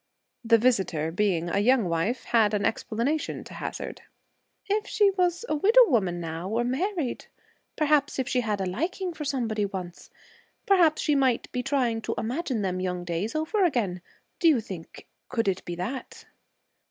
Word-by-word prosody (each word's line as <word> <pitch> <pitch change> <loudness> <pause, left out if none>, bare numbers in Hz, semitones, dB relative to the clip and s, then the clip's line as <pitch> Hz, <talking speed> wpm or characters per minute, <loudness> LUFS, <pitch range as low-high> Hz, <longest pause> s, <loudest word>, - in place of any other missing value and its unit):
The 230 0 +5
visitor, 190 -10 +1
being 175 -2 0
a 175 - 0
young 240 +1 +3
wife, 170 +9 -1
had 220 -3 +3
an 205 - 0
explanation 240 +8 -1
to - - -12
hazard. - - -6 0.6
'If 420 +2 -1
she 410 -2 +3
was 360 +1 0
a - - -1
widow 450 +10 +6
woman, 190 - +1
now, 165 +2 -5
or 230 +3 0
married 295 +3 -2 0.5
perhaps 295 -2 +2
she 250 0 +1
had 210 -3 -1
a 190 - -1
liking 340 - -2
for 305 -2 -6
somebody 230 -7 -1
once. 185 -3 -6 0.6
Perhaps 345 -6 +4
she 300 - +2
might 265 -4 +1
be 250 - -2
trying 250 -4 0
to - - -3
imagine 250 -2 -2
them 185 -1 -1
young 180 -1 -2
days 175 - -3
over 325 +7 +1
again. 220 - 0 0.4
Do 340 - +4
you 300 -6 +5
think 190 -7 -9 0.2
could 230 -4 -1
it 190 -1 0
be 175 - -4
that?' 235 +10 -6
235 Hz, 165 wpm, -26 LUFS, 190-305 Hz, 0.6 s, widow